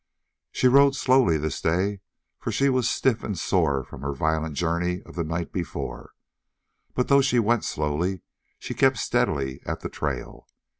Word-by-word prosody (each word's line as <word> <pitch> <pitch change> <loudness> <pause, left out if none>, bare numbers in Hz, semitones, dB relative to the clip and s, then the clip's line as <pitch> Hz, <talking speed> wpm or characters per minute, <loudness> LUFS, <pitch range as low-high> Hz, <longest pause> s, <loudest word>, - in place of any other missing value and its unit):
She 130 - +2
rode 140 +2 +6
slowly, 130 -11 +3
this 75 -2 -3
day, 95 +4 0 0.4
for - - -3
she 140 0 +2
was 130 -2 +2
stiff 125 -4 +1
and 100 -4 -3
sore 80 -6 +1
from 65 - -11
the 70 +1 -2
violent 80 +2 -1
journey 85 +4 -1
of - - -14
the 85 - -2
night 80 +1 -3
before, 90 -3 -5 0.8
but 125 - +1
though 140 0 +5
she 130 -2 +2
went 120 0 +2
slowly, 80 +5 -1 0.4
she - - -6
kept - - +3
steadily 65 -1 0
at - - -4
the - - -4
trail. - - -5
90 Hz, 165 wpm, -25 LUFS, 80-120 Hz, 0.8 s, rode